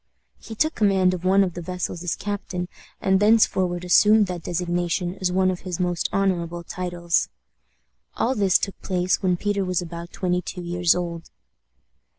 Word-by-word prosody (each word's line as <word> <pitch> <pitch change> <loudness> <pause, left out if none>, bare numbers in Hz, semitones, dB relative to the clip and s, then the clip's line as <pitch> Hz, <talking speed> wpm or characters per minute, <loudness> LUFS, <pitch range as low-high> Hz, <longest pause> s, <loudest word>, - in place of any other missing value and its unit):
He 225 - -9
took 310 +8 +1
command 190 -3 +3
of 180 -1 -5
one 195 +2 +4
of 180 -3 -2
the 175 - -6
vessels 180 -1 -4
as 175 - -1
captain, 190 -3 -4 0.3
and 190 0 +2
thenceforward 190 -4 +3
assumed 210 +4 +5
that 180 -2 -5
designation 175 +1 -2
as 180 -1 +1
one 185 0 +2
of 180 - -5
his 180 -2 -5
most 175 -2 0
honorable 175 -3 -1
titles. 175 -1 -1 0.9
All 250 - +1
this 200 -6 +3
took 195 - -5
place 185 -1 0
when 180 -2 +1
Peter 205 +1 -1
was 185 -2 0
about 170 0 -7
twenty 180 -1 -1
two 180 +1 -7
years 175 0 +2
old. 170 -2 -5
180 Hz, 165 wpm, -23 LUFS, 175-190 Hz, 0.9 s, assumed